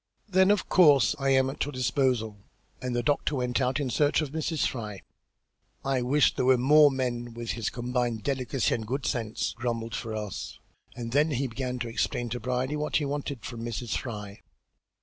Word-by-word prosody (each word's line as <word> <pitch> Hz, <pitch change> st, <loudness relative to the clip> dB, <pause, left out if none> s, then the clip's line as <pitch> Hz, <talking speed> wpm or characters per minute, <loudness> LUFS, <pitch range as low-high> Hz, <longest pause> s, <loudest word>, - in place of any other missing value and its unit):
"Then 190 Hz, -1 st, +4 dB
of 205 Hz, -2 st, +2 dB
course 145 Hz, -8 st, +5 dB
I 135 Hz, 0 st, +1 dB
am 130 Hz, -1 st, +4 dB
at -, -, -2 dB
your 145 Hz, -, -4 dB
disposal," 125 Hz, -4 st, 0 dB, 0.4 s
and 125 Hz, -1 st, -2 dB
the 120 Hz, -, 0 dB
doctor 145 Hz, +3 st, +1 dB
went 125 Hz, 0 st, 0 dB
out 130 Hz, +3 st, +1 dB
in 135 Hz, -4 st, -2 dB
search 145 Hz, +4 st, +2 dB
of 155 Hz, -4 st, -2 dB
Mrs. 160 Hz, 0 st, -1 dB
Fry. 105 Hz, -5 st, -4 dB, 0.8 s
"I 135 Hz, -2 st, +1 dB
wish 140 Hz, +5 st, +3 dB
there -, -, -1 dB
were 130 Hz, 0 st, +5 dB
more 145 Hz, +4 st, +6 dB
men 120 Hz, -3 st, -3 dB
with 120 Hz, -1 st, -4 dB
his 115 Hz, -3 st, -2 dB
combined 120 Hz, -2 st, -2 dB
delicacy 135 Hz, -2 st, 0 dB
and 110 Hz, -2 st, -3 dB
good 135 Hz, +4 st, -2 dB
sense," 115 Hz, -2 st, -2 dB
grumbled 115 Hz, -1 st, -3 dB
Ferrars, 110 Hz, -3 st, -5 dB, 0.4 s
and 115 Hz, -1 st, -5 dB
then 145 Hz, +4 st, +3 dB
he 135 Hz, -2 st, -1 dB
began 125 Hz, +1 st, -3 dB
to 120 Hz, -1 st, -3 dB
explain 120 Hz, +1 st, -1 dB
to 125 Hz, +2 st, -3 dB
Brierly 125 Hz, +4 st, -1 dB
what 150 Hz, +1 st, 0 dB
was 145 Hz, -, -2 dB
wanted 140 Hz, -4 st, -4 dB
from 115 Hz, -2 st, -6 dB
Mrs. 120 Hz, 0 st, -3 dB
Fry. 105 Hz, -4 st, -6 dB
125 Hz, 190 wpm, -28 LUFS, 120-140 Hz, 0.8 s, more